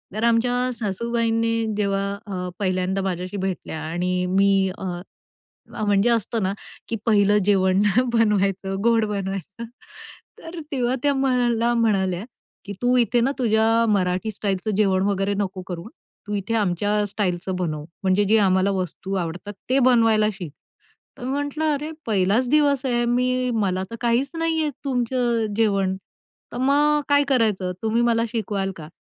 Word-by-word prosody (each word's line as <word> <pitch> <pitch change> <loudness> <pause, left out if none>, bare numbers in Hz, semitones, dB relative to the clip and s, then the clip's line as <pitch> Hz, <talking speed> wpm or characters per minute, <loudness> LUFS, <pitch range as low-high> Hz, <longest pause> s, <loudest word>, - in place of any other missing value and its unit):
तर 220 - -2
आमच्या 245 +2 +2
सासूबाईंनी 230 +2 0
जेव्हा 195 -1 0 0.2
अ, 180 -3 -4
पहिल्यांदा 185 0 0
माझ्याशी 185 +1 -3
भेटल्या 185 -4 -4
आणि 180 +3 -1
मी 195 0 +3
अ, - - -8 0.9
अ, - - -3
म्हणजे 205 +3 +3
असतं 230 -1 0
ना, 190 - 0 0.4
की 230 - -1
पहिलं 205 -2 +4
जेवण 190 -1 +3 0.3
बनवायचं, 200 -4 +1
गोड 230 -1 +3
बनवायचं. 195 +1 -4 0.7
तर 330 +1 -8
तेव्हा 250 -2 0
त्या 285 -1 +3
मला 245 -3 +1
म्हणाल्या, 195 -6 +1 0.4
की 200 - -6
"तू 245 +1 +3
इथे 240 0 +2
ना 260 +4 +2
तुझ्या 225 -1 +3
मराठी 185 +1 0
स्टाईलचं 205 0 -2
जेवण 190 -2 +2
वगैरे 200 0 0
नको 190 -2 -3
करु 175 -2 -5
हां. 220 - -11 0.4
तू 210 - -4
इथे 200 +3 -3
आमच्या 205 +1 +1
स्टाईलचं 190 -2 -2
बनव, 155 -5 -3 0.2
म्हणजे 190 +2 +3
जे 220 +3 +4
आम्हाला 190 0 +3
वस्तू 190 0 -4
आवडतात 180 +3 -4 0.2
ते 265 - +3
बनवायला 225 -3 +4
शिक." 180 -7 -8 0.7
तर - - -10
मी 260 - -2
म्हटलं, 290 +2 -2
"अरे! 300 +3 -4 0.2
पहिलाच 210 +4 +2
दिवस 285 -2 +3
आहे, 240 -2 +1
मी 250 +1 +1
मला 190 -4 0
तर - - -4
काहीच 240 +4 +1
नाही 330 -1 0
येत 305 -1 0
तुमचं 245 -2 0
अ, - - -2
जेवण. 195 -4 +1 0.6
तर - - -5
मग 295 +3 +3
काय 285 0 +5
करायचं? 215 -8 +1
तुम्ही 225 +2 +1
मला 230 -1 +2
शिकवाल 205 -4 -2
का?" 155 -2 -9
210 Hz, 155 wpm, -23 LUFS, 190-240 Hz, 0.9 s, काय